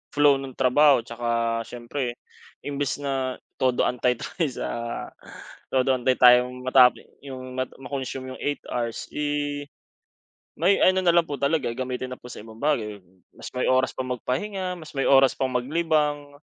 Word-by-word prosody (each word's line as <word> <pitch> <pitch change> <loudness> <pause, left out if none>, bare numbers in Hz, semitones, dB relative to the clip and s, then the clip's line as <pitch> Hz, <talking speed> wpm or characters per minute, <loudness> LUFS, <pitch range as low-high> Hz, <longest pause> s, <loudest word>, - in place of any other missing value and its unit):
flow 145 -2 +5
nung 135 -2 -8
trabaho 135 0 +4
'tsaka 115 0 -1
siyempre 120 +1 -4 0.5
imbis 145 0 -2
na 135 -2 -1 0.2
todo-antay 125 -1 +1
tayo 160 +7 -3
sa, 130 - -5 1.0
todo 130 0 +2
antay 130 +1 +1
tayong 125 0 +5
matape 130 -1 +5 0.2
yung 130 -2 -8
ma 130 - 0
ma-consume 130 -1 -5
8 145 0 -3
hours, 120 -2 -3
eh, 145 -1 -2 0.9
may 185 +5 +3
ano 185 0 +4
na 170 - +5
lang 170 0 +4
po 145 - -3
talaga, 140 +1 +1
gamitin 130 0 -3
na - - -5
po 125 - -11
sa - - -9
ibang 110 +1 -12
bagay. 110 -9 -1 0.4
Mas - - -9
may 125 - -1
oras 130 0 +2
pa - - -7
magpahinga, 180 - -3
mas 155 - -11
may 135 - +1
oras 135 -1 +5
pang 130 -1 -1
maglibang. 145 +1 0
130 Hz, 150 wpm, -25 LUFS, 125-145 Hz, 1.0 s, flow